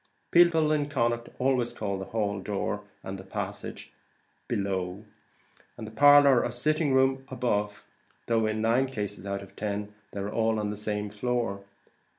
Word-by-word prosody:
People 165 -3 +5
in 145 -1 +1
Connaught 120 -4 0
always 125 -2 +1
call 100 -2 -3
the 95 - -5
hall, 100 -2 -1
door, 105 +1 -2 0.2
and 95 0 -7
passage 100 0 -6 0.5
"below," 95 0 -2 0.7
the 110 -2 -7
parlour, 145 0 +7
or - - -1
sitting 150 +4 +1
room, 130 0 +3
"above," 105 -6 -2 0.4
though, 115 -2 +2
in 110 0 -1
nine 120 +4 +3
cases 105 -5 -5
out 100 0 -3
of 95 - -15
ten, 105 0 -3 0.2
they 100 - -5
are 100 +2 -4
on 110 -2 +1
the - - -4
same 105 0 -3
floor. 115 -2 -2
110 Hz, 150 wpm, -28 LUFS, 100-130 Hz, 0.7 s, parlour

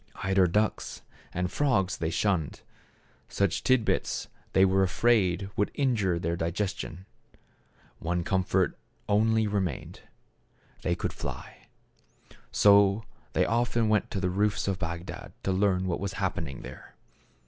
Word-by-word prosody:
Eider 95 -1 +4
ducks 105 +5 -1 0.3
and 90 +1 -2
frogs 95 -9 +1
they 80 - -1
shunned. 85 -3 0 0.7
Such 100 -4 0
tidbits 130 -4 +1 0.2
they 95 - +6
were 95 0 +3
afraid 95 -1 +2
would 105 - +1
injure 110 -11 +1
their 85 0 -1
digestion. 90 +1 -3 0.9
One 85 +1 -1
com 95 +2 +1
fort 95 0 +1 0.3
only 110 +2 +3
remained; 100 -8 -2 0.8
they - - 0
could - - -3
fly. - - -8 0.8
So 100 +1 +5 0.3
they - - +3
often 115 -1 +1
went 110 -1 +2
to 100 - -3
the 90 -1 0
roofs 100 +2 0
of 95 -2 -1
Bagdad 85 +1 -5
to 95 - 0
learn 95 -1 +2
what 90 -2 -1
was 100 0 -3
happening 90 -8 -3
there. 65 +1 -11
95 Hz, 130 wpm, -28 LUFS, 90-105 Hz, 0.9 s, they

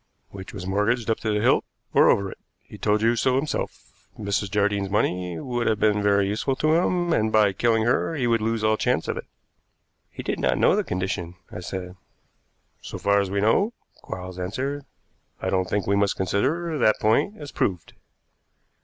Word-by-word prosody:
"Which 95 -1 -9
was 95 -3 -7
mortgaged 105 +5 +1
up 110 - 0
to 110 - -2
the 105 0 0
hilt - - +3 0.3
or - - +6
over 100 -1 +2
it; - - -12 0.2
he - - -13
told 105 +1 +1
you 115 +1 +3
so 130 +2 +2
himself. 145 +3 -4
Mrs. 100 -1 -1
Jardine's 100 -1 0
money 90 -4 -1
would 120 +4 -2
have 110 - +1
been 105 -1 +3
very 100 -1 +3
useful 110 +6 -1
to 155 +3 +2
him, 175 0 +2
and 110 -4 +1
by 105 -3 +4
killing 115 +2 +2
her 125 +7 +1
he 130 -5 -1
would 115 -2 +2
lose 115 0 -1
all 110 0 +3
chance - - 0
of - - -1
it." - - -7 0.8
"He - - -8
did - - -2
not - - +1
know - - +4
the - - +1
condition," 90 -1 -3 0.2
I - - -6
said. 90 0 -6 0.8
"So - - -7
far 100 0 +2
as 100 - -3
we 100 +1 -1
know," 195 - +2 0.3
Quarles 90 0 -7
answered. 135 +10 -3 0.5
"I - - -2
don't 95 -1 0
think 105 -1 0
we 100 - +2
must 100 0 +1
consider 150 - 0
that 110 -3 +3
point 140 - +2
as 145 -1 -8
proved. 90 -5 -2
105 Hz, 195 wpm, -24 LUFS, 95-120 Hz, 0.8 s, or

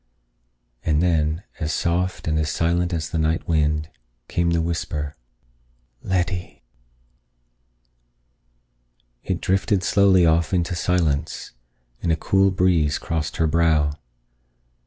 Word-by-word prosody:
And 75 -1 +1
then, 80 0 +1 0.2
as 80 -2 -2
soft 90 +3 -1
and 80 0 +1
as 75 -1 0
silent 85 +2 0
as 80 -3 -3
the 80 - -1
night 80 +1 0
wind, 75 -1 +1 0.4
came 85 0 0
the 85 0 +2
whisper: 80 -3 -3 0.9
"Letty." 90 -1 -2 2.6
It - - -2
drifted 95 0 +1
slowly 95 -2 +4
off 85 +2 +2
into 85 0 0
silence, 80 -4 -1 0.5
and 85 - 0
a - - +3
cool 95 +3 +2
breeze 90 -6 +2
crossed 80 -3 -3
her 80 - +2
brow. 80 -2 +2
85 Hz, 115 wpm, -23 LUFS, 80-90 Hz, 2.6 s, slowly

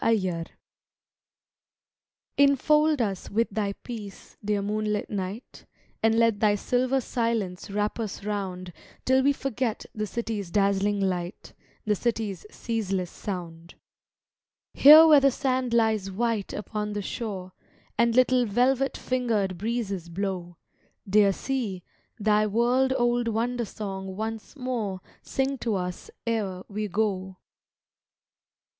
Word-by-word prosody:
NOCTURNE 185 -7 +1 1.9
Infold 300 +1 +4
us 195 -4 -4
with 230 +3 +1
thy 200 -1 -1
peace, 215 -5 -9
dear 205 -1 0
moon 210 +1 -1
lit 210 -1 -2
night, 200 +4 -6 0.3
And 225 0 +3
let 230 -3 +3
thy 210 -2 +4
silver 255 +5 +1
silence 230 -8 -2
wrap 210 +3 -1
us 210 -3 -4
round 185 -4 -4 0.3
Till 260 +1 +4
we 280 +2 +4
forget 260 -4 -2
the 215 0 -3
city's 220 -4 -4
dazzling 200 +1 +2
light, 185 -1 -3 0.3
The 210 - +2
city's 210 -3 -2
ceaseless 195 -7 -2
sound. 170 -3 -7 1.0
Here 305 +3 +10
where 305 -3 +8
the 275 0 +5
sand 255 -1 -1
lies 220 -4 +2
white 220 +1 -1
upon 210 0 -4
the 205 -1 -3
shore, 190 -5 -5 0.4
And 235 +1 +2
little 255 -1 +4
velvet 255 +5 +2
fingered 225 -7 0
breezes 200 -5 -3
blow, 175 -1 -4 0.5
Dear 200 0 +5
sea, 210 -5 -3 0.3
thy 215 -1 +2
world 245 +5 +2
old 240 0 +1
wonder 235 +2 -1
song 195 -2 -6
once 220 +4 -5
more 240 -8 -3 0.2
Sing 270 0 -1
to 230 -3 -1
us 180 -1 -4 0.2
e'er 200 -5 -1
we 210 +1 -3
go. 190 -2 -1
215 Hz, 125 wpm, -26 LUFS, 195-240 Hz, 1.9 s, Here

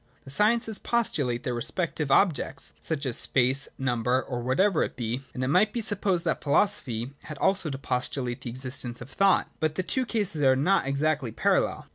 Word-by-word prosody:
The 135 - -9
sciences 220 +6 +2
postu 235 -10 0
late 120 0 -2
their 125 - -2
respective 150 +4 -2
objects, 170 +2 +1
such 155 -3 -3
as 125 -3 +3
space, 130 +1 +2
number, 125 -1 0
or 125 -2 -4
whatever 155 +9 +2
it - - -2
be; 120 +1 -3
and 130 - -2
it - - 0
might 185 +9 +3
be 240 - -3
supposed 200 -5 0
that - - -1
philo 145 +7 +4
sophy 120 - -2
had 150 - -7
also 190 0 +1
to 135 - -4
postulate 125 -1 -3
the - - -5
existence 125 -1 -4
of 125 +3 -10
thought. 195 +4 +2
But 155 -1 0
the 185 - -1
two 255 +6 0
cases 205 -10 0
are 130 -2 +5
not 145 +2 +2
exactly 140 -1 0
parallel. - - 0
140 Hz, 195 wpm, -27 LUFS, 125-190 Hz, -, are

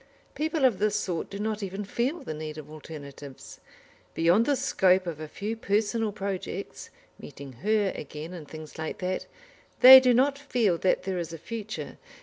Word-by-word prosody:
People 310 -1 0
of 230 -8 +3
this 210 0 +1
sort 180 -5 -2
do 200 - -7
not 215 +1 -2
even 195 +1 -4
feel 260 - -2
the 210 - -5
need 155 0 -6
of 155 0 -10
alternatives. 145 -3 -10 0.6
Beyond 175 +7 +3
the 285 - +3
scope 185 -6 +2
of 165 -3 -5
a 155 - -6
few 210 +8 -4
personal 220 +1 0
projects, 195 -2 -5 0.3
meeting 140 -1 -10
Her 210 -2 +2
again, 155 +4 -7
and 165 -5 -9
things 155 0 -10
like 160 - -4
that, 185 0 -3 0.5
they 260 +1 +12
do 255 -1 +3
not 275 +3 +2
feel 235 -11 0
that 185 - +1
there 190 -2 -2
is 170 -1 -5
a - - -6
future. 210 -3 -7
195 Hz, 175 wpm, -27 LUFS, 160-225 Hz, 0.6 s, they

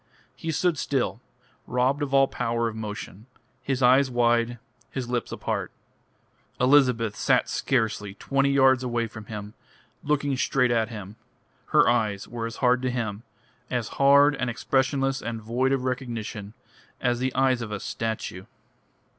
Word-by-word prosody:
He 165 - -6
stood 170 0 +1
still, 130 -3 -1 0.5
robbed 130 +4 +1
of 145 -2 -2
all 135 0 +5
power 115 -1 -1
of 110 - -5
motion, 105 0 -7 0.3
his 135 -1 -1
eyes 130 +2 +5
wide, 120 -1 +2 0.3
his 130 -3 -4
lips 120 -1 -2
apart. - - -3 0.9
Elizabeth 125 -5 +3
sat - - +2
scarcely 110 -6 -1
twenty 140 +5 +1
yards 135 -2 +4
away 120 -2 -1
from 110 -1 -9
him, 105 -1 -7 0.5
looking 145 -2 0
straight 125 -1 +2
at 115 -1 +1
him. 105 -2 -8 0.5
Her - - +4
eyes 110 -5 +1
were 115 -1 -4
as 115 - -7
hard 125 0 +4
to 130 - 0
him, 115 -4 -3 0.5
as 120 -4 -2
hard 140 +1 +6
and 125 - -1
expressionless 135 +2 0
and 115 0 -4
void 120 +5 0
of 135 -2 0
recognition, 115 -5 -4 0.4
as 120 -1 0
the 130 0 -2
eyes 130 -2 +2
of 110 -2 -5
a 105 - -3
statue. 110 -4 -4
120 Hz, 150 wpm, -26 LUFS, 115-135 Hz, 0.9 s, hard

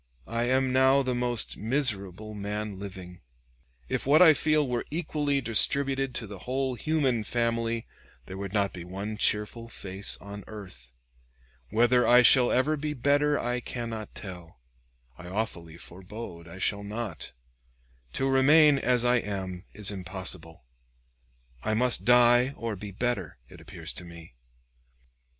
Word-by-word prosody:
I 115 +1 -2
am 130 +1 +1
now 130 +1 +4
the 130 -1 -1
most 120 -1 0
miserable 110 -5 -2
man 105 -1 -4
living. 95 -3 -9 0.7
If - - -3
what 150 +3 +6
I 165 -3 +8
feel 155 -1 +1
were 125 -1 -1
equally 150 -3 -1
distributed 135 +3 +3
to - - 0
the 100 -2 -9
whole 130 +4 -2
human 130 -3 0
family, 115 0 -1 0.4
there 95 - -8
would 100 -1 -5
not 100 -2 0
be 90 - -7
one 100 +4 -5
cheerful 110 +2 0
face 95 -2 -5
on 100 0 -9
earth. 90 - -11 0.8
Whether 120 - +3
I 125 +1 +7
shall 125 0 +6
ever 145 +5 +2
be 150 +1 -3
better 145 +3 +2
I 120 +1 -1
cannot 115 -3 -6
tell; 90 -8 -9 0.6
I 90 - -9
awfully 90 -5 -4
forebode 90 -1 -9
I 85 +3 -11
shall 100 +1 -1
not. 105 -5 -5 0.8
To 135 - 0
remain 140 +2 +5
as 125 -2 +1
I 120 0 +4
am 95 -4 -4
is 105 -1 +2
impossible; 95 -5 -6 1.0
I 110 - -1
must 125 +2 +2
die 125 +2 +5
or 115 -2 -3
be 100 +2 -8
better, 100 - -3
it - - -14
appears - - -7
to - - -6
me. 85 -4 -12
115 Hz, 145 wpm, -27 LUFS, 100-130 Hz, 1.0 s, I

